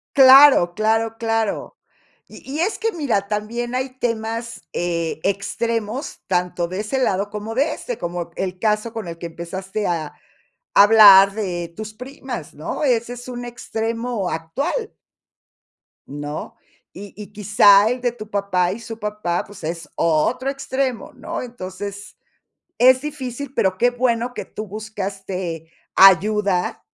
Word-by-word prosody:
Claro, 265 -9 +8
claro, 225 +1 +1
claro. 225 -2 -1 0.5
Y - - -14
y 310 - -2
es 395 +5 0
que 455 0 -1
mira, 255 - -1
también 230 +4 -3
hay 260 0 -3
temas, 230 0 -3
eh, 170 -2 -2
extremos, 225 +5 -2
tanto 180 -1 0
de 185 +3 -4
ese 240 +6 -2
lado 200 -4 0
como 210 +2 -5
de 295 +4 +1
este, 245 - -6
como 175 0 -4
el 185 -1 -4
caso 215 +1 0
con 225 -6 -6
el 165 - -7
que 170 - -6
empezaste 185 +5 -5
a 160 -4 -2 0.6
a - - +8
hablar 200 -2 +8
de 175 -5 -4
tus 215 0 -7
primas, 250 - -8
¿no? 155 - -4
Ese 240 -2 +1
es 245 0 -10
un 245 -1 -6
extremo 230 -2 -3
actual 275 - -3 1.1
¿no? 145 +1 -6 0.4
Y 200 +1 -10
y 210 0 -10
quizá 205 0 +5
el 250 +2 -2
de 245 -1 0
tu 215 -3 -10
papá 190 -3 0
y 205 - -5
su 225 -1 -8
papá, 210 -5 -2
pues, 205 -3 -13
es 165 -1 -4
otro 170 - +1
extremo, 270 -3 -3
¿no? 330 +1 -5
Entonces, 200 -4 -7 0.6
es 255 +1 +6
difícil, 280 -2 -6
pero, 190 -7 +1
qué 245 +5 +4
bueno 245 0 0
que - - -6
tú 215 - -7
buscaste 190 -5 -5 0.2
ayuda, 195 0 +4
215 Hz, 145 wpm, -21 LUFS, 190-245 Hz, 1.1 s, Claro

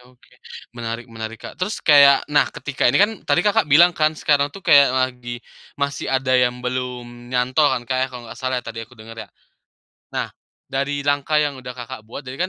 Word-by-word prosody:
oke, - - -26 0.4
menarik 115 0 -6
menarik, 110 0 -7
Kak. - - -9
Terus 195 +4 -3
kayak 140 -2 +6
nah, 145 - +4
ketika 145 -3 -2
ini - - +3
kan, 210 +2 +4 0.2
tadi 175 - +3
Kakak 205 -6 +2
bilang 170 +5 +6
kan 155 -2 0
sekarang 145 -2 +2
tuh 195 - -11
kayak 140 -3 +6
lagi 125 -2 -3 0.3
masih 140 0 -3
ada 130 -1 0
yang 125 0 0
belum 125 -1 -5
nyantol 130 +4 +2
kan, 120 -2 -3
kayak 130 0 +1
kalau 125 -1 -8
nggak - - -10
salah 130 -1 -2
tadi 115 -1 -7
aku 125 - -20
denger, 115 +1 -10
ya. - - -34 0.8
Nah, - - -2 0.4
dari 140 +1 -2
langkah 145 +1 +1
yang 145 -3 0
udah 125 0 -9
Kakak 125 0 -8
buat 140 - -8
jadi 135 +9 -3
130 Hz, 190 wpm, -21 LUFS, 120-145 Hz, 0.8 s, kayak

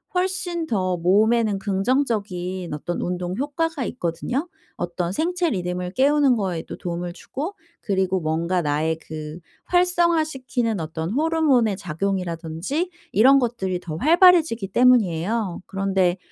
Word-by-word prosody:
훨씬 360 -2 -1
더 185 -4 0
몸에는 210 +4 +3
긍정적인 195 - -1
어떤 175 +4 -4
운동 180 0 -3
효과가 290 0 -2
있거든요. 245 - -3 0.3
어떤 175 0 -2
생체 345 - 0
리듬을 180 -1 -3
깨우는 280 -1 +4
거에도 185 -6 -3
도움을 175 -1 -4
주고 300 - -6 0.3
그리고 190 -2 0
뭔가 165 +3 0
나의 155 +2 0
그 155 0 -7 0.3
활성화시키는 315 - +1
어떤 160 +3 -4
호르몬의 280 - +2
작용이라든지 180 - -3 0.2
이런 265 +7 +6
것들이 210 -8 -2
더 160 -2 -6
활발해지기 320 - +4
때문이에요. 215 -4 +2
그런데 195 -2 +1
200 Hz, 310 characters per minute, -23 LUFS, 175-275 Hz, 0.3 s, 이런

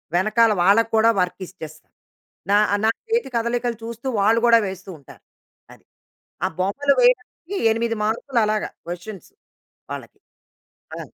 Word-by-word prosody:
వెనకాల 215 +5 +3
వాళ్ళకి 205 +6 +4
కూడా 220 +1 +5
వర్క్ 180 +1 -1
ఇచ్చేస్తా. 155 -3 -11 0.6
నా 205 - +5 0.3
నా - - +4 0.2
చేతి 460 - 0
కదలికలు 235 0 -1
చూస్తూ, 235 +3 -7
వాళ్ళు 220 +3 +3
గూడా 230 -1 +6
వేస్తూ 190 0 -8
ఉంటారు. 140 - -17 0.5
అది. - - -20 0.6
ఆ - - +2
బొమ్మలు 280 +10 +1
వేయడానికి 485 -6 +1 0.2
8 230 0 -1
మార్కులు 235 +3 -1
అలాగా 215 0 -1 0.2
క్వెషన్స్ 175 +2 -8 0.6
వాళ్ళకి - - -8 0.8
ఆ! - - -6
225 Hz, 130 wpm, -22 LUFS, 195-235 Hz, 0.8 s, గూడా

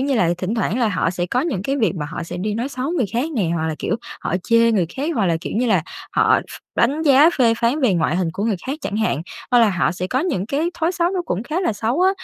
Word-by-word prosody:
như 275 +1 +1
là, 180 -8 +2
thỉnh 190 +5 -2
thoảng 225 0 0
là 235 - +2
họ 175 -4 0
sẽ 175 -1 -2
có 245 +8 0
những 265 - -2
cái 275 +5 -1
việc 220 -7 +1
mà 150 -3 -3
họ 170 - -5
sẽ 175 +1 -6
đi 205 +3 -2
nói 240 +5 -2
xấu 270 +2 -3
người 270 - 0
khác 260 +8 -1
nè, 200 - 0
hoặc 160 -1 -1
là, 155 - -2
kiểu, 220 - -1 0.2
họ - - -2
chê 230 +1 +4
người 185 -6 +2
khác, 290 +5 -1
hoặc 215 -7 +1
là, 165 -2 +2
kiểu - - -5
như 245 +2 +1
là, 190 -7 +3 0.3
họ - - +4
ph - - -13 0.2
đánh 285 +7 +2
giá 295 +2 +6
phê 230 -3 +4
phán 245 +6 +1
về 240 -8 +3
ngoại 170 0 +1
hình 180 -3 0
của 200 - -3
người 220 -4 +1
khác 280 +4 -3
chẳng 210 - -3
hạn, 190 -9 0 0.3
hoặc 245 - +5
là 225 -3 +5
họ 180 -2 +1
sẽ 180 +1 -4
có 255 +6 0
những 280 - -1
cái 300 +8 -1
thói 340 +1 0
xấu 345 0 +1
nó 370 -2 -1
cũng 200 - -2
khá 315 +8 -2
là 350 - +1
xấu 230 +9 -1
á. 375 +1 +5
230 Hz, 300 wpm, -20 LUFS, 185-280 Hz, 0.3 s, giá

